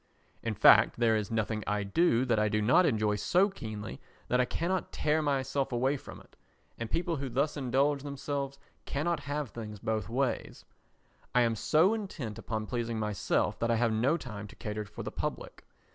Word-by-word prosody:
In 115 Hz, -1 st, -2 dB
fact 105 Hz, +1 st, +6 dB
there 115 Hz, -2 st, +3 dB
is 105 Hz, -3 st, -1 dB
nothing 110 Hz, -1 st, -1 dB
I 105 Hz, 0 st, 0 dB
do 125 Hz, -, +2 dB
that 115 Hz, -4 st, +2 dB
I 105 Hz, 0 st, +2 dB
do 105 Hz, -, +1 dB
not 130 Hz, +12 st, +5 dB
enjoy 110 Hz, -4 st, +1 dB
so 185 Hz, -, +3 dB
keenly 110 Hz, -, -7 dB, 0.3 s
that 125 Hz, +1 st, +3 dB
I -, -, +2 dB
cannot 175 Hz, +7 st, -2 dB
tear 155 Hz, +1 st, +1 dB
myself 140 Hz, -2 st, 0 dB
away 130 Hz, +4 st, +1 dB
from 140 Hz, -, -9 dB
it, -, -, -20 dB, 0.4 s
and 115 Hz, -1 st, -4 dB
people 170 Hz, -1 st, -1 dB
who 135 Hz, -1 st, -4 dB
thus 140 Hz, +5 st, 0 dB
indulge 140 Hz, +1 st, +1 dB
themselves 140 Hz, -1 st, -4 dB, 0.3 s
cannot 165 Hz, +4 st, -1 dB
have 145 Hz, -3 st, -4 dB
things 105 Hz, -2 st, -7 dB
both 110 Hz, -1 st, -2 dB
ways. 130 Hz, +2 st, -2 dB, 0.7 s
I 125 Hz, -, +6 dB
am 115 Hz, -1 st, +2 dB
so 160 Hz, -, +3 dB
intent 170 Hz, -, -5 dB
upon 110 Hz, -1 st, -3 dB
pleasing 115 Hz, -1 st, -2 dB
myself 105 Hz, -3 st, 0 dB
that 115 Hz, -, 0 dB
I 115 Hz, -, +3 dB
have 115 Hz, -1 st, +2 dB
no 125 Hz, +9 st, +2 dB
time 110 Hz, -8 st, -7 dB
to -, -, -14 dB
cater 105 Hz, 0 st, -4 dB
for -, -, -8 dB
the -, -, -5 dB
public. -, -, -5 dB
120 Hz, 190 wpm, -30 LUFS, 110-145 Hz, 0.7 s, fact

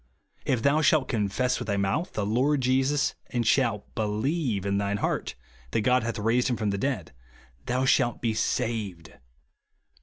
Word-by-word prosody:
"If 125 Hz, -4 st, 0 dB
thou 145 Hz, +2 st, +3 dB
shalt 155 Hz, -3 st, +3 dB
confess 120 Hz, +3 st, 0 dB
with 120 Hz, -, -5 dB
thy 100 Hz, -2 st, 0 dB
mouth 100 Hz, -, -1 dB
the 105 Hz, -, -1 dB
Lord 130 Hz, +7 st, +2 dB
Jesus, 135 Hz, +3 st, +2 dB, 0.2 s
and 120 Hz, -1 st, -1 dB
shalt 115 Hz, -4 st, +1 dB
believe 110 Hz, -, -1 dB
in 100 Hz, 0 st, +1 dB
thine 100 Hz, 0 st, -1 dB
heart -, -, -2 dB, 0.3 s
that 110 Hz, -, 0 dB
God 125 Hz, +3 st, +3 dB
hath 115 Hz, 0 st, -3 dB
raised 115 Hz, +4 st, +1 dB
him 120 Hz, -, 0 dB
from 105 Hz, -2 st, -1 dB
the 100 Hz, -, -2 dB
dead, 115 Hz, -, -2 dB, 0.5 s
thou 130 Hz, +2 st, +1 dB
shalt 120 Hz, -2 st, +2 dB
be 115 Hz, -2 st, 0 dB
saved," 110 Hz, -6 st, -2 dB
(Rom. -, -, -21 dB
115 Hz, 175 wpm, -27 LUFS, 105-130 Hz, 0.5 s, thou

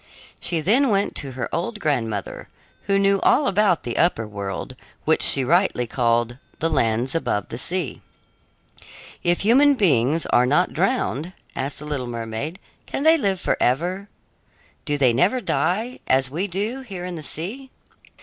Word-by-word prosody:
She 165 Hz, -3 st, -2 dB
then 240 Hz, -, +3 dB
went 200 Hz, -1 st, +1 dB
to 135 Hz, -2 st, -4 dB
her 130 Hz, 0 st, -3 dB
old 210 Hz, +6 st, -2 dB
grandmother, 115 Hz, -, -2 dB, 0.4 s
who 195 Hz, 0 st, +2 dB
knew 195 Hz, 0 st, +3 dB
all 295 Hz, -, +4 dB
about 200 Hz, -5 st, +2 dB
the 120 Hz, -, -3 dB
upper 115 Hz, -11 st, +2 dB
world, 100 Hz, -2 st, -5 dB, 0.3 s
which -, -, +2 dB
she 135 Hz, -, +3 dB
rightly 165 Hz, -3 st, +2 dB
called 120 Hz, 0 st, 0 dB, 0.2 s
"the 165 Hz, +1 st, 0 dB
lands 120 Hz, -2 st, +1 dB
above 105 Hz, -11 st, -1 dB
the 115 Hz, -, -6 dB
sea." 180 Hz, -3 st, -2 dB, 1.2 s
"If 175 Hz, 0 st, +1 dB
human 275 Hz, +7 st, +5 dB
beings 155 Hz, -, +2 dB
are 125 Hz, +1 st, +3 dB
not 170 Hz, +7 st, +2 dB
drowned," 180 Hz, -, -1 dB, 0.2 s
asked 135 Hz, +2 st, -3 dB
the 150 Hz, -, -7 dB
little 140 Hz, -4 st, -3 dB
mermaid, 115 Hz, +7 st, -4 dB, 0.3 s
"can 275 Hz, -, -3 dB
they 320 Hz, +1 st, +6 dB
live 195 Hz, -6 st, 0 dB
forever? 180 Hz, +12 st, 0 dB, 0.8 s
Do 145 Hz, -1 st, 0 dB
they 130 Hz, -4 st, +4 dB
never 185 Hz, -, +2 dB
die, 230 Hz, +2 st, -1 dB
as 130 Hz, 0 st, +2 dB
we 175 Hz, +7 st, -2 dB
do 205 Hz, +8 st, -3 dB
here 195 Hz, -8 st, -7 dB
in 180 Hz, -, -5 dB
the 160 Hz, -, -6 dB
sea?" 205 Hz, -, -4 dB
165 Hz, 160 wpm, -22 LUFS, 125-200 Hz, 1.2 s, they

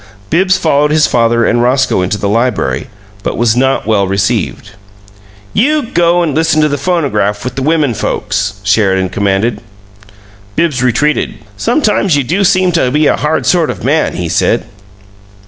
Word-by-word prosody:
Bibbs 185 Hz, +2 st, +2 dB
followed 150 Hz, -4 st, +1 dB
his 155 Hz, 0 st, +3 dB
father 115 Hz, -1 st, +2 dB
and 120 Hz, 0 st, +1 dB
Roscoe 130 Hz, -4 st, +1 dB
into 90 Hz, +3 st, -1 dB
the 100 Hz, -, -2 dB
library, 105 Hz, -, -1 dB, 0.3 s
but -, -, -3 dB
was 115 Hz, -1 st, +2 dB
not 135 Hz, +2 st, +1 dB
well 105 Hz, -3 st, +1 dB
received. 100 Hz, +1 st, -2 dB, 0.8 s
"YOU 295 Hz, +6 st, +2 dB
go 175 Hz, +1 st, +2 dB
and 155 Hz, -4 st, -1 dB
listen 160 Hz, +1 st, +1 dB
to -, -, +3 dB
the 145 Hz, -1 st, -2 dB
phonograph 130 Hz, -, -1 dB
with 125 Hz, 0 st, -4 dB
the 135 Hz, -, -4 dB
women 150 Hz, -3 st, +1 dB
folks," 100 Hz, -1 st, -2 dB
Sheridan 95 Hz, -2 st, +1 dB
commanded. 100 Hz, +4 st, -1 dB, 0.9 s
Bibbs 155 Hz, -7 st, 0 dB
retreated. 130 Hz, +5 st, 0 dB, 0.2 s
"Sometimes 205 Hz, -, +1 dB
you 140 Hz, -, +1 dB
do 175 Hz, +11 st, 0 dB
seem 185 Hz, -1 st, +2 dB
to 160 Hz, -7 st, +1 dB
be 150 Hz, +4 st, +1 dB
a -, -, +3 dB
hard 155 Hz, +2 st, -1 dB
sort 170 Hz, -3 st, +2 dB
of -, -, -5 dB
man!" 150 Hz, +5 st, 0 dB
he 90 Hz, -, -3 dB
said. -, -, 0 dB
130 Hz, 165 wpm, -12 LUFS, 105-160 Hz, 0.9 s, his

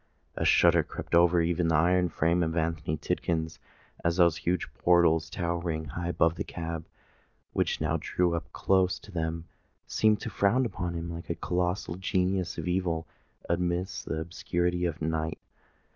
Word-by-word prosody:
A -, -, -1 dB
shudder -, -, +5 dB
crept -, -, -8 dB
over 85 Hz, 0 st, +5 dB
even 85 Hz, 0 st, +1 dB
the 80 Hz, -, +2 dB
iron 90 Hz, +3 st, +3 dB
frame 85 Hz, +3 st, +1 dB
of 80 Hz, 0 st, -1 dB
Anthony 80 Hz, -1 st, -1 dB
Tidkins, 80 Hz, 0 st, -2 dB, 0.4 s
as 85 Hz, 0 st, +1 dB
those 85 Hz, -3 st, +4 dB
huge 90 Hz, 0 st, -1 dB
portals, 85 Hz, -2 st, +3 dB
towering 85 Hz, -3 st, -2 dB
high 85 Hz, +4 st, -4 dB
above 85 Hz, -1 st, +2 dB
the 85 Hz, -, -4 dB
cab 80 Hz, -1 st, -5 dB, 0.7 s
which -, -, 0 dB
now -, -, 0 dB
drew 90 Hz, -1 st, +1 dB
up 85 Hz, -, -4 dB
close 95 Hz, -1 st, +2 dB
to 105 Hz, -, -14 dB
them, 80 Hz, -1 st, -3 dB, 0.4 s
seemed 110 Hz, -1 st, +2 dB
to -, -, -5 dB
frown 120 Hz, +6 st, +2 dB
upon 90 Hz, -5 st, -3 dB
him 85 Hz, 0 st, -4 dB
like 85 Hz, +1 st, -8 dB
a 85 Hz, -, -1 dB
colossal 90 Hz, +1 st, -1 dB
genius 95 Hz, -1 st, 0 dB
of -, -, -4 dB
evil 90 Hz, -3 st, 0 dB, 0.4 s
amidst 90 Hz, +2 st, -1 dB
the 80 Hz, -, -2 dB
obscurity 85 Hz, +2 st, -1 dB
of 80 Hz, -2 st, -3 dB
night. 80 Hz, 0 st, -1 dB
85 Hz, 160 wpm, -28 LUFS, 80-90 Hz, 0.7 s, shudder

